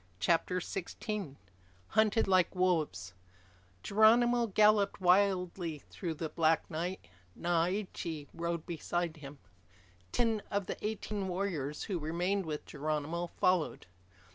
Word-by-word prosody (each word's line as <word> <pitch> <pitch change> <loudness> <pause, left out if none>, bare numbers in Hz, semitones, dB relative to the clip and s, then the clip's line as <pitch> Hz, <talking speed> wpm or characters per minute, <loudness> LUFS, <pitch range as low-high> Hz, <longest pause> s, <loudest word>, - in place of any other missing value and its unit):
CHAPTER 170 - +2
SIXTEEN 190 - -5 0.5
Hunted 220 0 +3
Like 185 -1 +3
Wolves 155 - 0 0.7
Geronimo 235 +3 +5
galloped 210 0 +4
wildly 180 -4 +2
through 170 -4 -4
the 160 +1 -3
black 160 0 +2
night. 175 +4 -3 0.3
Naiche 170 -2 -1
rode 170 -1 -3
beside 170 0 -2
him. 145 -1 -10 0.7
Ten 225 -3 +1
of 200 -1 -1
the - - -6
eighteen 210 -2 -3
warriors 175 -6 -2
who 190 -5 -2
remained 175 +4 -1
with 150 -1 -4
Geronimo 155 +3 -2
followed. 180 -1 0
180 Hz, 110 wpm, -32 LUFS, 160-200 Hz, 0.7 s, Geronimo